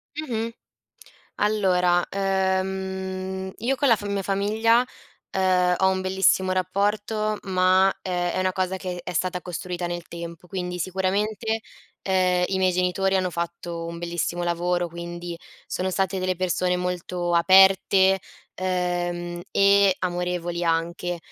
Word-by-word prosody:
Mh-mh. 230 -7 -2 0.9
Allora, 180 -4 +2
ehm, 190 -1 -2
io 250 +4 0
con 280 -1 +2
la 230 - +6
fa 205 - -7
mia 200 -1 -1
famiglia, 220 +5 +2 0.5
ehm, 180 -1 +2
ho 190 - +4
un 190 0 0
bellissimo 190 0 +2
rapporto 205 +3 0
ma, 185 0 +4
ehm, 175 -1 -1
è - - -2
una 185 0 +1
cosa 185 0 -1
che 180 -2 -5
è 180 - -5
stata 180 +2 -1
costruita 180 0 -4
nel 175 0 -5
tempo. 170 0 -8
Quindi 180 -1 -4
sicuramente, 205 +5 -1 0.4
ehm, 185 -1 +2
i 190 - 0
miei 185 -1 +3
genitori 185 +2 +1
hanno 185 -1 0
fatto 170 0 -4
un 170 0 -6
bellissimo 175 0 -2
lavoro, 175 0 0
quindi 170 0 -6 0.3
sono 185 +1 -2
state 190 0 0
delle 185 -1 -1
persone 180 0 0
molto 180 -1 -2
aperte, 190 +1 +5 0.3
ehm, 175 -1 -2
e 200 -1 +5
amorevoli 175 -1 -2
anche; 170 +1 -1
185 Hz, 130 wpm, -24 LUFS, 175-190 Hz, 0.9 s, la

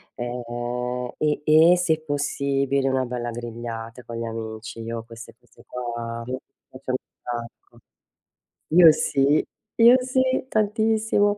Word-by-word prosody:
ehm, 120 +1 -4
e 150 -1 0
e 160 +3 +6
se 160 -3 +1
possibile, 140 -2 0
una 130 0 +1
bella 120 -1 -4
grigliata 115 0 -7
con 115 0 -7
gli 115 - -3
amici. 115 +1 -6
Io 115 0 -5
queste 115 0 -12
queste - - -22
qua, 120 -1 -5
mi 130 +1 -3 0.3
piacciono 130 -1 -3 0.2
tanto. 120 -1 -8 0.9
Io 165 0 +8
sì, 140 0 +2 0.3
io 235 +2 +8
sì 260 0 +1
tantissimo 215 -1 +2
125 Hz, 120 wpm, -24 LUFS, 120-160 Hz, 0.9 s, Io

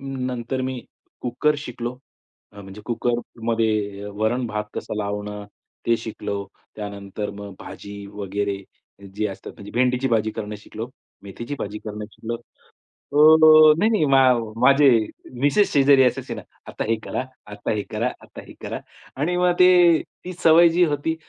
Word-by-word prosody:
नंतर 130 -2 -4
मी 130 -1 -3 0.4
कुकर 125 +5 +1
शिकलो. 125 -3 -6 0.5
अ, 100 - -11
म्हणजे 95 +1 -11
कुकरमध्ये 115 -3 -1
वरण-भात 110 0 -1
कसं - - -5
लावणं 105 0 -4 0.4
ते 115 - +4
शिकलो. 100 -3 -5 0.3
त्यानंतर 100 0 -5
मग 100 -1 -9
भाजी 100 0 -9
वगैरे 100 0 -3 0.5
जे 105 - 0
असतात 95 - -9
म्हणजे 100 - -11
भेंडीची 125 +2 +1
भाजी 110 -2 +1
करणं 105 0 -6
शिकलो, 110 +2 -8 0.3
मेथीची 115 +7 -7
भाजी 105 +1 -5
करणं 105 0 -5
शिकलो. 115 +1 -5 0.6
अ, 145 - -11
अ, 155 0 +8
नाही, 215 +5 +3
नाही, 215 -8 +2
मा 135 -1 +5 0.4
माझे 140 +3 +6 0.5
मिसेस 145 +9 +3
शेजारी 140 -1 +6
असायची 125 - -1
ना - - -8 0.3
"आता - - -4
हे 115 - +3
करा, - - -3 0.3
आता 105 0 -5
हे 105 - -1
करा, 110 +3 -1
आता - - -11
हे - - -12
करा." - - -4 0.4
आणि 160 +6 0
मग 180 0 +3
ते 175 -2 +7 0.3
ती 180 - -5
सवय 165 +1 +7
जी 175 +2 +3
होती 150 +1 -1
120 Hz, 150 wpm, -23 LUFS, 105-145 Hz, 0.6 s, अ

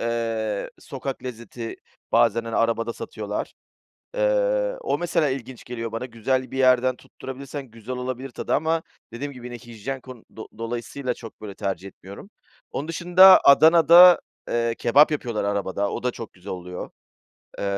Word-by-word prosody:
eee, 115 -3 -2
sokak 135 -1 -6
lezzeti 115 -1 -7 0.4
bazen, 115 0 +3
hani, 115 - -3
arabada 115 0 +1
satıyorlar. 105 -2 -5 0.7
Eee, - - +1
o 465 - -1
mesela 165 -3 +1
ilginç 130 -2 -6
geliyor 115 -2 -5
bana. 115 +2 -4
Güzel 130 +2 -2
bir 135 - -5
yerden 130 -1 +4
tutturabilirsen 135 +1 -8
güzel 115 +3 -7
olabilir 130 +1 -5
tadı 120 - -4
ama 160 +1 0 0.3
dediğim 140 +5 -5
gibi, 125 -1 -9
yine 120 - -7
hijyen 120 +2 -7
kon 125 -3 -12
do 110 - -7
dolayısıyla 120 +3 -4
çok, 115 -1 -12
böyle, 105 -2 -8
tercih 95 -1 -4
etmiyorum. 100 - -12 0.4
Onun 145 - -4
dışında 180 +3 +7
Adana'da, 170 +4 +8 0.3
eee, 115 -1 0
kebap 145 +6 +5
yapıyorlar 120 -7 -2
arabada. 100 0 -1
O - - -5
da 125 - +1
çok 115 -2 -9
güzel 95 +2 -9
oluyor, 90 0 -7 0.7
eee, - - -3
125 Hz, 150 wpm, -24 LUFS, 115-140 Hz, 0.7 s, Adana'da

